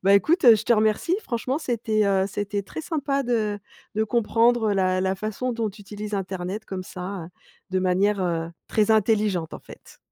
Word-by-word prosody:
Bah, 200 +1 +6
écoute, 325 - +3
je 215 - -1
te 240 - +4
remercie. 220 - +2
Franchement, 255 +3 -2
c'était, 220 -6 0
heu, 195 -1 +2
c'était 205 0 -3
très 200 - -7
sympa 280 -4 -1
de 220 -4 0 0.4
de 220 +1 +1
comprendre 230 0 +2
la 185 -1 +1
la 190 0 +1
façon 215 +5 -3
dont 225 -3 -2
tu 210 - -15
utilises 210 +1 -6
internet 190 +1 -4
comme 190 -3 -5
ça, 180 -2 -6 0.4
de 185 - +1
manière, 190 +2 +2
heu, 165 -2 -1 0.2
très 215 0 +2
intelligente 210 -6 +1
en - - -8
fait. - - -15
210 Hz, 180 wpm, -24 LUFS, 190-230 Hz, 0.4 s, Bah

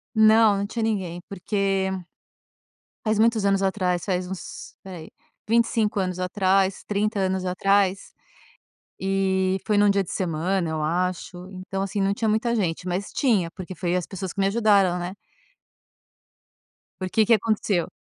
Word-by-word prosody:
Não, 220 -1 +6
não 200 - -1
tinha 230 +2 -4
ninguém. 190 -6 -2
Porque 195 0 -1 1.2
Faz 215 -1 +1
muitos 225 -1 +3
anos 195 -1 +2
atrás, 185 -3 0
faz 180 -1 -1
uns, 190 0 -8
espera 190 -2 -10
aí, 160 - -11 0.4
25 225 -2 +2
anos 185 -1 -2
atrás, 190 +1 +1
30 210 +1 -1
anos 190 -1 0
atrás. 195 +1 +1 0.9
E 190 0 +1
foi 210 - +2
num 205 0 +5
dia 200 -1 +2
de - - -10
semana, 175 0 -1
eu 155 -1 -2
acho. 180 +2 -2
Então, 195 +1 -5
assim, 195 +1 -2
não 195 +1 +2
tinha 220 +2 -1
muita 220 +2 +1
gente, 180 -5 -1
mas 185 +2 -3
tinha 210 - +1
porque 185 +1 -8
foi 175 +1 -1
as 180 - -2
pessoas 190 -2 -6
que - - -4
me 195 - +3
ajudaram, 200 -4 +3
né. 175 +1 -5 1.9
Porque, 185 +4 +2
que 230 - +5
aconteceu. 210 -5 0
195 Hz, 155 wpm, -24 LUFS, 185-205 Hz, 1.9 s, Não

